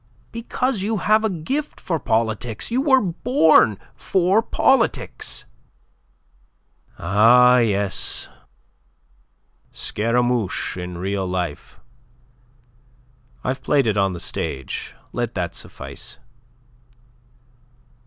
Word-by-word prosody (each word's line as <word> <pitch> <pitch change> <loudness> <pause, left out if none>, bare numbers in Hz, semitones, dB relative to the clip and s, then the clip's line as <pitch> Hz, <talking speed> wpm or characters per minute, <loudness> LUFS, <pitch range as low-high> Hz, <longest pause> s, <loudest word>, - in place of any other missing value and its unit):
"Because 235 0 -2
you 215 +3 -1
have 215 +3 +3
a 220 - +2
gift 235 - -3
for 165 -3 -2
politics. 110 - -1
You 250 +3 +2
were 265 -3 +4
born 170 - +3 0.2
for 190 +3 +2
politics." 245 +1 0 1.5
"Ah, 120 +7 +5
yes 100 -4 -1 1.4
Scaramouche 115 -2 0
in 90 -1 -6
real 95 +1 -2
life. 90 -5 -4 1.6
I've 130 +1 -2
played 140 -3 +2
it 110 -2 +1
on 100 -2 +1
the 85 - -6
stage. 70 -5 -5 0.2
Let - - -3
that - - -2
suffice. 70 +1 -8
125 Hz, 90 wpm, -22 LUFS, -, 1.6 s, Ah